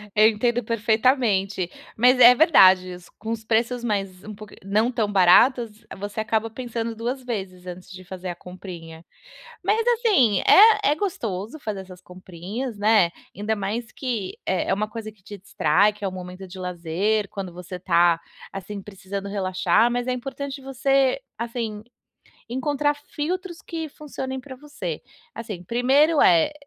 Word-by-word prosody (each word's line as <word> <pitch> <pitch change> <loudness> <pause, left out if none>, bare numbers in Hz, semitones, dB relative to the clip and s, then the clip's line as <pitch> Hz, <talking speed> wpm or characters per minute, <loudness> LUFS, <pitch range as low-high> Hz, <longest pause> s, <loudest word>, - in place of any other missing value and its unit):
Eu 215 0 +7
entendo 240 +2 0
perfeitamente, 220 -4 +1 0.3
mas 250 +3 +4
é 245 0 +10
verdade 190 - +6
is 180 -1 -12
com 220 - -7
os 225 -1 -4
preços 235 +2 0
mais 195 -4 -3
um 215 - -8
pouq 210 0 -12
não 215 +5 +1
tão 220 -4 -1
baratos, 215 +4 +4
você 205 +2 -5
acaba 225 0 -1
pensando 230 -1 -5
2 250 +3 -4
vezes 190 -6 -6
antes 180 +1 -9
de 185 0 -10
fazer 185 0 -7
a 175 - -4
comprinha. 175 -3 -10 0.6
Mas, 420 +4 +2
assim, 415 - +3
é 430 -7 +7
é - - +2
gostoso 230 - -4
fazer 215 -6 -5
essas 185 -1 -12
comprinhas, 185 +7 -7
né, 205 -4 +4 0.2
ainda 215 +2 -2
mais 215 +4 -4
que, 230 -8 -4
eh, 185 - 0
é 190 - +3
uma 215 +2 -2
coisa 215 0 -7
que 210 -3 -26
te 205 +1 -10
distrai, 195 +2 +2
que 205 -1 -9
é - - +1
um - - -5
momento 185 +1 -8
de 185 +1 -11
lazer, 180 +4 -1
quando 195 -3 -6
você 180 +1 -8
tá, 170 -2 +3 0.3
assim, 195 +1 -7
precisando 195 0 -7
relaxar, 185 +3 +2
mas 245 +1 -2
é 255 - 0
importante 275 +2 -5
você, 270 - +1 0.2
assim, 230 -3 -4 0.7
encontrar 290 +3 0
filtros 335 +5 -5
que 325 -1 -5
funcionem 265 -3 -6
pra 260 0 -10
você. 255 - -6 0.3
Assim, 210 -6 -7
1º, 270 - +3
eh, 170 - +5
215 Hz, 160 wpm, -23 LUFS, 185-250 Hz, 0.7 s, é